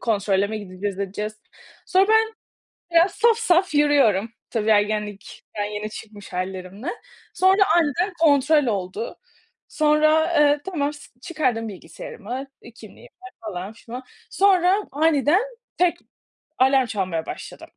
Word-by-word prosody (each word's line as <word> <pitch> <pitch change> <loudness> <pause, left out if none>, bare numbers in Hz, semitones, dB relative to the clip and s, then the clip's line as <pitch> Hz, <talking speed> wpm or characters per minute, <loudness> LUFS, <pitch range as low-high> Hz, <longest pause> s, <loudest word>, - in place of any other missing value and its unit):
kontrole 200 -3 +1
mi 215 +1 -4
gideceğiz, 195 0 -5
edeceğiz. 210 +2 -4 0.5
Sonra 380 +2 +3
ben 445 0 +3 0.6
biraz 335 +3 +4
saf 460 0 +3
saf 365 -6 +2
yürüyorum, 275 -8 +3 0.2
tabii, 220 -1 0
ergenlikten 210 0 -1
yeni 210 +1 -5
çıkmış 210 -2 -11
hâllerimle. 185 - -5 0.5
Sonra 380 +2 +4
aniden 345 +5 +1
kontrol 290 -1 +4
oldu. 205 0 -3 0.5
Sonra, 310 +2 +3
eee, 290 0 +4
tamam, 300 -6 -2
s 290 - -14
çıkardım 255 -9 -1
bilgisayarımı, 215 +7 -8 0.2
iii, 235 - -13
kimliğimi 260 - -15 0.3
falan 200 -2 -6
filan. 235 +3 -9 0.3
Sonra 380 -1 +4 0.2
aniden 305 - +3 0.4
tek 360 -1 +3 0.6
alarm 265 0 +4
çalmaya 185 -7 -3
başladı. - - -8
255 Hz, 120 wpm, -23 LUFS, 205-320 Hz, 0.6 s, biraz